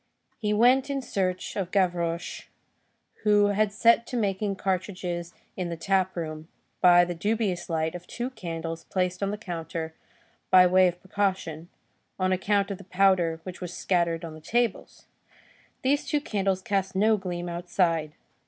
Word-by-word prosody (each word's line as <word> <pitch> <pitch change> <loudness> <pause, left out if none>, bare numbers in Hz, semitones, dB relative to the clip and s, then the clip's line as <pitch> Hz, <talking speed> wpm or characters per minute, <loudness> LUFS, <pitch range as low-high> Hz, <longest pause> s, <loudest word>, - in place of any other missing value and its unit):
He 210 -3 -1
went 250 +6 +4
in 280 -1 -1
search 185 -5 -2
of 190 -3 -2
Gavroche, 175 -3 -1 0.7
who 205 -1 +4
had 205 0 +1
set 230 +2 +4
to 250 - -3
making 200 -2 0
cartridges 180 -2 -3 0.2
in 180 -2 -3
the 170 - -4
tap 190 +2 +1
room, 155 -1 -5 0.3
by 175 -1 +7
the 175 - -3
dubious 205 0 -1
light 160 -1 0
of 180 0 -8
two 245 +2 -4
candles 165 -6 -5
placed 185 0 -1
on 200 - 0
the 205 - -3
counter 165 -5 -5 0.6
by 185 -1 +8
way 185 +1 +5
of 175 0 -3
precaution, 185 -4 -2 0.5
on 185 0 +1
account 200 +2 +1
of 195 - -5
the - - -10
powder 180 -3 +2
which 185 +1 -8
was 180 -1 -6
scattered 170 -2 0
on 160 - -7
the 155 - -11
tables. 235 +5 -1 0.8
These 280 +2 +1
two 295 - +1
candles 195 -8 -1
cast 190 -1 -1
no 215 +3 +4
gleam 180 -3 -4
outside. 170 -3 0
185 Hz, 160 wpm, -27 LUFS, 175-205 Hz, 0.8 s, by